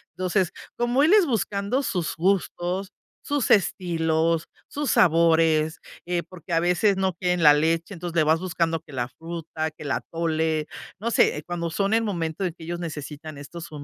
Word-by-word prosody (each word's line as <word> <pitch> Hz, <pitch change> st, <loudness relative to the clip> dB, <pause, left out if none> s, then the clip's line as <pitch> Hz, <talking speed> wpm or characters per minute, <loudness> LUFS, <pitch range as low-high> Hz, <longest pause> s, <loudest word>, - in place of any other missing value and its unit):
entonces, 185 Hz, -1 st, 0 dB, 0.3 s
como 240 Hz, +3 st, +2 dB
él 325 Hz, +6 st, +5 dB
es 420 Hz, -4 st, +6 dB
buscando 215 Hz, -, -1 dB
sus 180 Hz, -8 st, -2 dB
gustos, 185 Hz, +1 st, 0 dB, 0.3 s
sus 285 Hz, -3 st, 0 dB
estilos, 165 Hz, -4 st, +2 dB, 0.2 s
sus 290 Hz, -1 st, -3 dB
sabores, 160 Hz, -2 st, +4 dB, 0.3 s
eh, 175 Hz, -1 st, 0 dB
porque 175 Hz, -1 st, -8 dB
a 165 Hz, -, +4 dB
veces 180 Hz, +3 st, +2 dB
no 190 Hz, -1 st, +1 dB
quieren 180 Hz, 0 st, 0 dB
la 150 Hz, -, +9 dB
leche, 165 Hz, +5 st, 0 dB
entonces 175 Hz, -1 st, -6 dB
le 160 Hz, -, +4 dB
vas 160 Hz, +2 st, +3 dB
buscando 165 Hz, -2 st, -1 dB
que 150 Hz, -3 st, -16 dB
la 120 Hz, -1 st, -2 dB
fruta, 165 Hz, -1 st, -5 dB
que 155 Hz, -, -13 dB
el 145 Hz, -, -3 dB
atole, 160 Hz, 0 st, -1 dB, 0.3 s
no 235 Hz, +3 st, -2 dB
sé, 150 Hz, -7 st, +3 dB
cuando 170 Hz, -1 st, -3 dB
son 195 Hz, +5 st, 0 dB
el 225 Hz, -, +4 dB
momento 170 Hz, -4 st, -2 dB
en 180 Hz, -, -1 dB
que -, -, -11 dB
ellos 170 Hz, +1 st, -4 dB
necesitan 150 Hz, -2 st, -7 dB
estos, 165 Hz, +4 st, -9 dB
170 Hz, 175 wpm, -25 LUFS, 160-190 Hz, 0.3 s, la